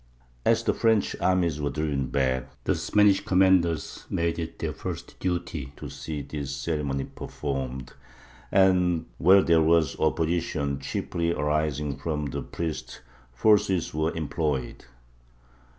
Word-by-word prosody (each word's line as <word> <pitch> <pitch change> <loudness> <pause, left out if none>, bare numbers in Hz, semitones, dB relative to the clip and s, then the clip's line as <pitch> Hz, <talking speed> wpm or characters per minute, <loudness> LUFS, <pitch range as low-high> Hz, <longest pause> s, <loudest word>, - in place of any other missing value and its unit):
As - - +3
the - - +2
French 110 -3 +2
armies 85 -5 +1
were 70 - 0
driven 75 -4 -1
back, 65 -1 0
the - - +2
Spanish 100 -1 +3
commanders 95 -4 +2
made 85 0 -1
it 80 - -5
their - - -3
first - - -7
duty 85 -6 -3
to - - -7
see 75 -3 -5
this 70 -2 -5
ceremony 70 -1 -2
performed, 65 -2 -5 0.6
and 90 -4 +3
where 95 +4 +6
there 85 -1 +4
was 80 -2 +3
opposition, 80 -3 0
chiefly 85 +4 -2
arising 75 -2 -1
from 75 +1 -2
the 70 +1 -3
priests, 80 -2 -5 0.3
force 100 - +4
was 80 -3 -1
employed. 75 -5 -2
80 Hz, 125 wpm, -26 LUFS, 70-85 Hz, 0.6 s, where